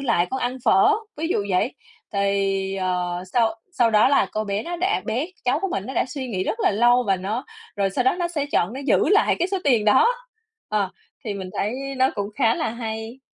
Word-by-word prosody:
lại 230 -10 +1
con 265 - -2
ăn 250 +1 -1
phở?" 390 +2 +5 0.2
Ví 320 - -2
dụ 205 - 0
vậy. 190 +7 +1 0.4
Thì, 195 -1 0
ờ, 180 -1 -2
sau 225 -2 +2 0.2
sau 240 -9 +3
đó 215 +2 +5
là 275 - +3
cô 215 - -1
bé 200 0 -2
nó 345 +1 -4
đã 375 +4 0
bé 245 +7 -1 0.2
cháu 255 +5 +1
của 390 - -1
mình 200 - -3
nó 265 - -6
đã - - +2
suy 260 0 -5
nghĩ 190 -4 -2
rất 455 - -2
là - - +3
lâu 240 +4 +4
và 195 - +2
nó 210 +8 -3 0.3
rồi 200 -1 +1
sau 245 +6 -1
đó 260 - +3
nó 345 -1 0
sẽ 295 -4 -2
chọn 175 +5 +1
nó 265 - -6
giữ - - +3
lại 415 +3 +4
cái 350 - 0
số 390 - -1
tiền 240 -7 +3
đó. 215 - +5 0.6
Ờ, 205 -3 0 0.3
thì 210 - -3
mình 190 -2 -6
thấy 210 +3 0 0.2
nó 260 +1 +3
cũng 205 -1 -3
khá 230 -4 +3
là 315 - -1
hay. 225 +1 -5
225 Hz, 235 wpm, -23 LUFS, 200-275 Hz, 0.6 s, phở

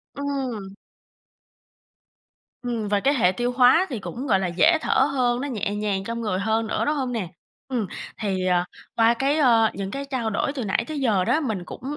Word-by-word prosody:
Ừm. 260 -8 -4 1.9
Ừm, 235 -4 -3
và 205 0 +2
cái 275 +7 +2
hệ 210 -10 +3
tiêu 240 +6 -1
hóa 250 +8 +5
thì 245 -6 -4
cũng, 245 +7 -6
gọi 195 -6 +3
là, 190 - -1
dễ 310 - +4
thở 265 - +3
hơn, 245 -2 +1
nó 285 - -3
nhẹ 210 -5 -2
nhàng 205 -2 -1
trong 230 +3 -4
người 210 -5 -1
hơn 220 +2 0
nữa, - - -1
đúng 300 - +1
hông 260 -3 -2
nè? 220 -7 -2 0.4
Ừm, 245 -6 -2 0.3
thì, 190 -3 -1
ờ, 180 -1 +2 0.3
qua 230 0 +5
cái, 275 +5 0
ơ, 230 -6 +4
những 195 0 -5
cái 275 +3 -4
trao 260 -5 -2
đổi 220 +6 -1
từ 260 -6 -4
nãy 195 - +1
tới 310 -2 -4
giờ 215 -8 +2
đó, 305 - +2
mình 220 - -2
cũng - - -9
235 Hz, 205 wpm, -24 LUFS, 205-270 Hz, 1.9 s, hóa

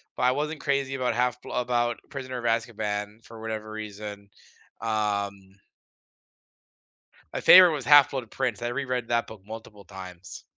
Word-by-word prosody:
but - - -3
I 125 - +5
wasn't 150 +2 -3
crazy 140 -1 0
about 125 -3 -1
Half-Bl 125 0 -1
about 120 -1 0
Prisoner 130 -2 -6
of 120 - -7
Azkaban 110 -2 -2
for 115 -1 -12
whatever 110 -1 -5
reason. 105 -1 -7 0.5
Um 100 -3 -2 1.8
My - - -3
favorite 180 -2 +9
was 140 -4 -3
Half-Blood 140 -5 +5
Prince, 120 -4 -2
I 120 - -2
reread 125 -2 -2
that 120 0 +1
book 110 -3 -12
multiple 105 -2 -10
times. 90 -2 -10
115 Hz, 140 wpm, -26 LUFS, 105-125 Hz, 1.8 s, favorite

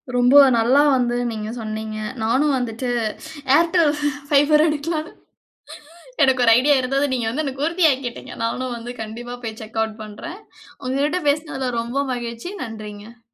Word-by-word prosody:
ரொம்ப 245 +3 +7 0.2
நல்லா 255 +5 +4
வந்து 240 -1 +1 0.2
நீங்க 215 -1 -5
சொன்னீங்க, 215 0 -5 0.3
நானும் 270 +6 +2
வந்துட்டு 245 0 -3 0.7
Airtel 335 -1 +3 0.4
Fiber 295 +1 +5
எடுக்கலாம்னு, 310 +1 -2 1.1
எனக்கு 260 -2 +3
ஒரு 230 - +6
ஐடியா 285 +3 +4
இருந்தது, 275 +2 0
நீங்க 240 -3 -1
வந்து 280 +7 -2
எனக்கு 275 +1 -2
உறுதியாக்கிட்டங்க, 285 -8 0
நானும் 250 +2 -3
வந்து 240 +1 -7
கண்டிப்பா 240 +3 -6
போய் 220 -1 -6
செக் 220 +1 -6
ஆட் 220 -1 -5
பண்ணுறேன், 330 - -8 0.5
உங்ககிட்ட 285 +7 0
பேசினதுல 285 -3 -2
ரொம்ப 245 +5 -2
மகிழ்ச்சி. 235 +5 -6
நன்றிங்க. 220 0 -9
255 Hz, 135 wpm, -21 LUFS, 230-290 Hz, 1.1 s, ரொம்ப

